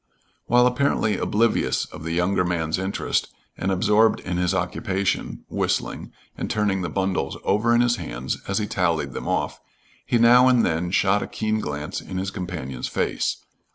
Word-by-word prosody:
While 125 +1 +5
apparently 125 -5 +1
oblivious 115 +2 +1
of - - -11
the 85 - -4
younger 90 +2 +1
man's 85 -1 -1
interest, 95 +1 -1 0.3
and 95 - -2
absorbed 105 +4 +3
in 90 -1 -3
his 90 0 +1
occupation, 95 +1 -2
whistling, - - -2 0.2
and - - -4
turning 100 -3 0
the 90 - -2
bundles 95 -1 -1
over 115 +4 +2
in 120 - +4
his 120 0 +2
hands 65 -7 -4
as 95 - -1
he 105 - 0
tallied 85 -5 0
them - - -5
off, - - -1 0.4
he 120 - +1
now 120 +2 +7
and 125 -3 +4
then 85 +2 0
shot 95 +2 +2
a - - -4
keen 110 0 -1
glance 75 -5 -4
in 95 - -6
his 95 +1 -2
companion's 85 -10 -5
face. - - -2
95 Hz, 170 wpm, -23 LUFS, 90-110 Hz, 0.4 s, now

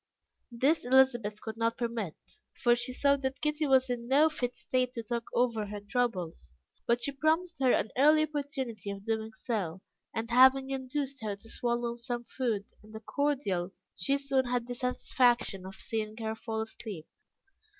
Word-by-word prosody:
This 270 +7 +2
Elizabeth 245 -5 +3
could 220 0 -6
not 230 0 0
permit, 230 -8 -3 0.4
for 240 -1 +4
she 240 +1 -3
saw 280 +2 +3
that 265 -1 -3
Kitty 300 0 0
was 265 -1 +5
in 240 -1 -3
no 290 +5 +5
fit 250 -5 -3
state 255 -1 -1
to 230 - -4
talk 235 +1 -3
over 230 -4 +1
her 205 0 -5
troubles, 200 - -2 0.3
but 235 0 +2
she 280 - 0
promised 315 +4 0
her 260 -2 +4
an 220 - +1
early 305 +4 +6
opportunity 275 - -4
of 200 0 -6
doing 220 0 -1
so, 195 -7 -3 0.3
and 230 +1 -4
having 265 +2 +6
induced 270 0 -3
her 210 -2 -2
to 200 +3 -17
swallow 240 0 -2
some 240 0 -4
food 230 -5 -2 0.2
and 215 +1 -14
a - - -5
cordial, 220 -9 -1 0.2
she 275 +10 +1
soon 275 -2 +1
had 245 -1 -1
the 245 - -4
satisfaction 240 -5 +1
of 190 - -9
seeing 220 -1 -3
her 220 -1 -2
fall 220 0 -4
asleep. 215 -6 -7
240 Hz, 170 wpm, -30 LUFS, 220-265 Hz, 0.4 s, early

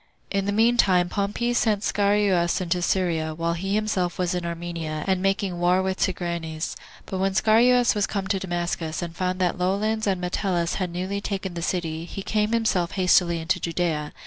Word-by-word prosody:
3. 200 - +1
In 195 - -2
the 205 - 0
mean 230 +3 +3
time 180 -5 +4
Pompey 205 +5 -1
sent 215 -4 +1
Scaurus 200 -5 +2
into 180 -1 -1
Syria, 165 -4 0
while 165 +1 -1
he 175 +3 -4
was 195 - +1 0.2
himself 180 -2 -1
in 180 -1 -1
Armenia, 165 -2 -4
and 190 -1 +1
making 195 -2 0
war 180 +2 +3
with 190 0 -2
Tigranes; 170 -4 -2 0.3
but 190 - -4
when 190 0 0
Scaurus 235 +5 +4
was 205 -2 0
come 200 -2 -3
to 195 -1 +1
Damascus, 175 -3 -3
and 170 -1 -6
found 185 0 -1
that 180 0 0
Lollins 210 +4 0
and 190 -2 +1
Metellus 180 -1 -1
had 180 - -1
newly 185 +3 -3
taken 195 -2 -3
the 170 - -5
city, 165 -2 -2
he 195 +3 -7
came 210 +1 0
himself 220 -7 +1
hastily 180 -2 +3
into 160 - 0
Judea. 165 -3 -1
185 Hz, 190 wpm, -24 LUFS, 170-200 Hz, 0.3 s, time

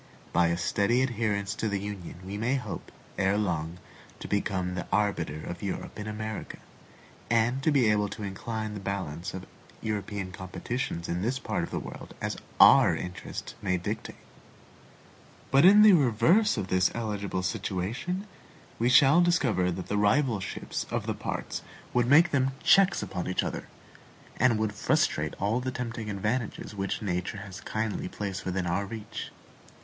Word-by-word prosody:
By 85 0 +4
a 85 0 0
steady 100 +7 +2
adherence 110 -4 -1
to 110 -1 -2
the 100 -1 -1
Union 100 -3 -6
we 95 +2 -5
may 115 +6 0
hope, 125 -7 -5 0.3
erelong, 90 -5 0 0.4
to - - -7
become 95 -3 -1
the 90 -1 -4
arbiter 85 -7 0
of 85 - -6
Europe 100 +2 -5
in 105 - -5
America, 110 0 -5 0.7
and 120 +3 +2
to 145 - +2
be 135 -6 +4
able 105 -1 +2
to 105 - -7
incline 110 +2 -4
the 105 - -5
balance 95 -2 -4
of 95 - -7 0.3
European 105 -3 -3
competitions 95 +1 -4
in 85 +1 -2
this 120 +6 0
part - - -2
of - - -3
the - - -3
world - - -8
as - - -2 0.2
our - - +8
interest 90 +1 -6
may 90 -1 +1
dictate. 90 - -4 1.4
But 135 +4 +6
in 205 +3 +9
the 215 -2 +9
reverse 165 - +4
of 95 -3 -3
this 95 0 +3
eligible 100 -5 -2
situation, 110 - -2 0.5
we 120 +2 +3
shall 140 +6 +7
discover 135 - +2
that 90 +1 -4
the 105 - -1
rivalships 110 -1 0
of - - -2
the - - -1
parts - - -4 0.3
would 120 -1 +2
make 160 +6 +6
them 135 -1 +2
checks 195 0 +5
upon 90 -2 -4
each 90 - 0
other, - - -4 0.7
and 120 -2 +4
would 110 -1 -1
frustrate 105 - +1
all 105 +5 +1
the 130 +1 -2
tempting 115 -3 -4
advantages 110 +3 -2
which 100 +2 -3
nature 90 +1 -2
has 100 -1 -8
kindly 110 -3 -2
placed 100 -1 -5
within 95 0 -1
our 90 +4 -1
reach. 110 0 -6
105 Hz, 160 wpm, -28 LUFS, 95-120 Hz, 1.4 s, in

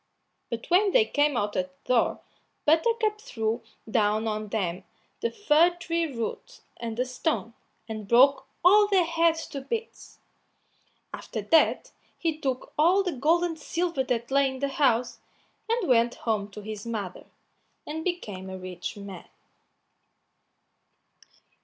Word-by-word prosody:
But 235 -1 -4
when 390 +2 +4
they - - +6
came 290 - +1
out 205 -2 -1
at 185 0 -1
the 255 - 0
door, 235 - +2 0.4
Buttercup 425 +7 +2
threw 225 - -2 0.3
down 215 0 +1
on 215 0 -2
them 190 -5 -2 0.4
the 465 - 0
fir 345 -4 +3
tree 335 -1 -1
root 240 - -5 0.2
and 230 -1 -5
the 250 - +1
stone, 250 -2 -2 0.3
and 215 -2 -6
broke 265 +5 +5 0.2
all 415 +3 +7
their 385 -4 +3
heads 330 -1 +2
to 275 - -5
bits. 455 - -6 1.0
After - - -5
that 325 - +3 0.3
he 330 -3 -1
took 265 -4 -3
all 360 +6 +5
the 365 - -1
gold 320 +5 +2
and 330 -2 -2
silver 340 -5 -1
that 240 -1 -2
lay 275 0 +4
in 265 - -6
the 280 +1 -1
house, 250 -4 +1 0.5
and 460 -4 0
went 240 -2 +3
home 210 -3 0
to 210 +1 -9
his 210 -1 -7
mother, 210 -6 -5 0.6
and 315 +2 -5
became 210 - -4
a 190 - -6
rich 185 +2 -6
man. 200 -3 -9
265 Hz, 145 wpm, -27 LUFS, 220-335 Hz, 1.0 s, all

